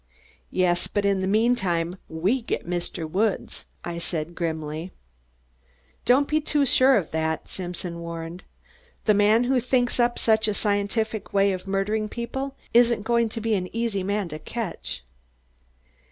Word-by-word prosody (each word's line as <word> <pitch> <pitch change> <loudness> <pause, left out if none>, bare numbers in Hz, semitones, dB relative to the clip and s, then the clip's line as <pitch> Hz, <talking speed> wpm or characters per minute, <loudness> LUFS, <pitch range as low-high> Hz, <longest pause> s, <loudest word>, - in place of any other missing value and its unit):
"Yes, 175 -1 +1
but 205 -1 -1
in 200 -1 +3
the 190 - 0
meantime, 195 -6 +2
we 190 +11 +1
get 225 - -3
Mr. 175 -1 -3
Woods," 200 +6 -1 0.2
I 170 0 -4
said 170 -1 -3
grimly. 160 0 -3 1.1
"Don't 270 +3 +4
be 310 0 +1
too 295 -1 +2
sure 260 0 +5
of 180 -6 -2
that!" 160 0 -1
Simpson 175 -2 -5
warned. 170 +1 -6 0.6
"The 215 - +5
man 210 +3 +4
who 255 +1 +2
thinks 245 0 +1
up 240 0 +3
such 220 -1 +3
a 210 - 0
scientific 210 +1 -1
way 200 0 +4
of 185 +1 -6
murdering 210 +2 0
people 265 +4 -4 0.2
isn't 235 -2 +5
going 235 0 +2
to 225 - -5
be 225 0 +1
an 185 -3 -1
easy 230 -4 0
man 200 0 -1
to 155 0 -6
catch." 225 - -4
200 Hz, 155 wpm, -25 LUFS, 175-235 Hz, 1.1 s, sure